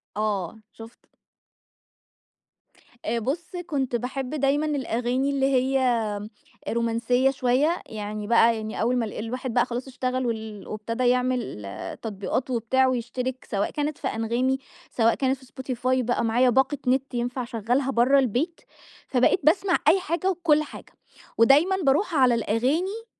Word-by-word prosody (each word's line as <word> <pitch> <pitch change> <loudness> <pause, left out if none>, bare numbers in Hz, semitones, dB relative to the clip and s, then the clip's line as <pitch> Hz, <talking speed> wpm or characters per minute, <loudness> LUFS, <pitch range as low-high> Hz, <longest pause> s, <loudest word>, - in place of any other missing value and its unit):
آه، 210 -2 -2
شُفت. 225 +1 -14 1.9
آآ، 235 +1 0
بُص، 280 +9 -3 0.2
كنت 270 -6 -1
باحب 250 +2 -3
دايمًا 290 +1 +1
الأغاني 260 -2 -1
اللي 275 -1 +1
هي 265 0 +2 0.9
رومانسية 235 +3 +1
شوية، 270 +6 +1
يعني 210 -1 -6
بقى 235 0 +5
يعني 215 0 -5
أول 240 +3 +2
ما 235 - 0
ال 210 - -7
الواحد 245 +3 -4
بقى 245 0 +3
خلاص 250 +1 -5
اشتغل 255 0 -2
وال 220 -3 -4
وابتدى 230 +4 -2
يعمل 250 - 0 0.4
تطبيقات 220 +4 -3
وبتاع 255 +2 +2
ويشترك، 255 +1 -3
سواء 200 -2 -1
كانت 295 0 -2
في - - -3
أنغامي، 235 +4 0 0.3
سواء 230 -1 +3
كانت 265 0 0
في 260 - -18 0.3
Spotify، 255 +2 +1
بقى 245 0 0
معايا 245 +3 +3
باقة 265 +4 +2
نت 265 +1 +1
ينفع 245 +1 -2
أشغلها 245 +3 -1
برّا 255 +3 +4
البيت، 270 - -1 0.5
فبقيت 255 +7 +3
باسمع 360 +3 +3
أي 340 +5 +6
حاجة 370 +1 -1
وكل 330 -5 +2
حاجة - - -12 0.4
ودايمًا 285 +11 +5
بارُوح 320 +6 +2
على 255 -4 +5
الأغاني 300 - -1
255 Hz, 140 wpm, -25 LUFS, 230-275 Hz, 1.9 s, أي